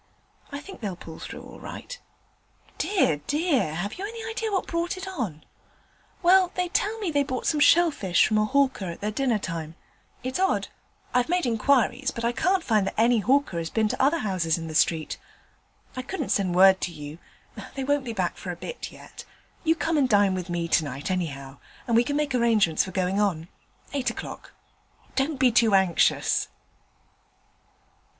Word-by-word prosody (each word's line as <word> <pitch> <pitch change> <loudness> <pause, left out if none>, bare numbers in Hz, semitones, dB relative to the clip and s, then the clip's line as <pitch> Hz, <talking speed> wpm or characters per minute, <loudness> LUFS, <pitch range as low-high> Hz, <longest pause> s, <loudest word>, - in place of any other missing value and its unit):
I 280 - -5
think 380 0 -11
they'll 200 -5 -3
pull 165 -2 -11
through - - -8
all - - -12
right.' - - -8 0.8
'Dear, 370 - +2
dear! 290 - +1
Have 200 - -4
you - - -4
any 450 0 -7
idea 450 -1 -3
what 385 - 0
brought 340 +3 -2
it 380 +1 -6
on?' 230 - -4 0.8
'Well, 365 +1 +5
they 360 -1 -1
tell 420 +5 0
me 405 -6 -2
they 285 -1 +2
bought 260 -2 -3
some 305 - +1
shell 340 +3 +6
fish 190 -11 +2
from 215 0 +2
a 215 - +3
hawker 270 -4 +1
at 170 -2 -6
their 210 +1 -1
dinner 245 0 +1
time. 165 -5 -5 0.5
It's 255 +6 -3
odd. 380 0 +1 0.4
I've 250 +4 +2
made 360 -3 +1
inquiries, 255 +3 +2
but 230 -4 -4
I 235 - +2
can't 365 +9 +1
find 215 -7 +2
that - - -4
any 235 +1 +4
hawker 255 -5 +1
has 165 -1 -4
been 220 +3 +1
to - - -2
other 285 +5 +3
houses 185 - 0
in 165 - -6
the 160 - -6
street. 155 0 +1 0.8
I 255 - -3
couldn't 295 +1 -4
send 185 -3 +1
word 190 +1 +6
to 175 - -2
you; 150 0 -9 0.6
they 270 - -3
won't 285 +1 +1
be 240 - -4
back 185 -5 -2
for 185 - -7
a 175 - -3
bit 485 - -7
yet. - - -12 0.4
You 325 -1 +3
come 325 -1 0
and 265 -3 +2
dine 205 -3 +4
with 185 -1 -4
me 170 -1 -2
tonight, 145 -1 0
anyhow, 140 -7 -4 0.3
and 235 -3 +1
we 235 - +5
can 285 +3 -2
make 295 -2 0
arrangements 225 -9 +3
for 190 - -7
going 185 +1 0
on. 175 -5 -1 0.4
Eight 265 -4 0
o'clock. 235 - -8 0.6
Don't 280 +2 0
be 255 -1 +4
too 225 -3 +4
anxious.' 190 -3 +2
235 Hz, 190 wpm, -26 LUFS, 180-295 Hz, 0.8 s, shell